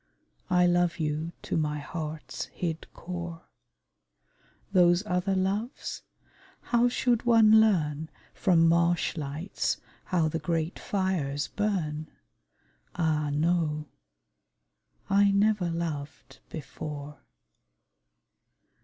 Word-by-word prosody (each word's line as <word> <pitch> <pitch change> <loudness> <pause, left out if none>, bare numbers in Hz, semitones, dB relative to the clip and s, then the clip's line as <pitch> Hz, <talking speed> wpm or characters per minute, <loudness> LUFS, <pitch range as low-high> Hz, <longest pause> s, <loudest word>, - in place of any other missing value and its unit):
I 180 -1 +4
love 175 -1 +2
you 155 +1 -2
to - - -2
my 150 -2 0
heart's 155 +1 -5
hid 165 -2 -5
core: 170 -1 -6 1.3
Those 175 0 +4
other 180 0 0
loves? 200 +6 -2 0.6
how 240 0 +2
should 240 -1 +1
one 220 -2 +7
learn 160 -7 +1 0.2
From 165 -3 +4
marshlights 170 -1 0 0.3
how 170 -4 +1
the 160 +1 -2
great 165 0 -2
fires 165 -8 -1
burn? 160 -8 -1 0.9
Ah, 155 -3 +1
no! 155 -1 0 1.2
I 200 +1 +4
never 200 -2 +2
loved 160 -4 -5
before! 150 -1 -7
170 Hz, 90 wpm, -28 LUFS, 155-190 Hz, 1.3 s, one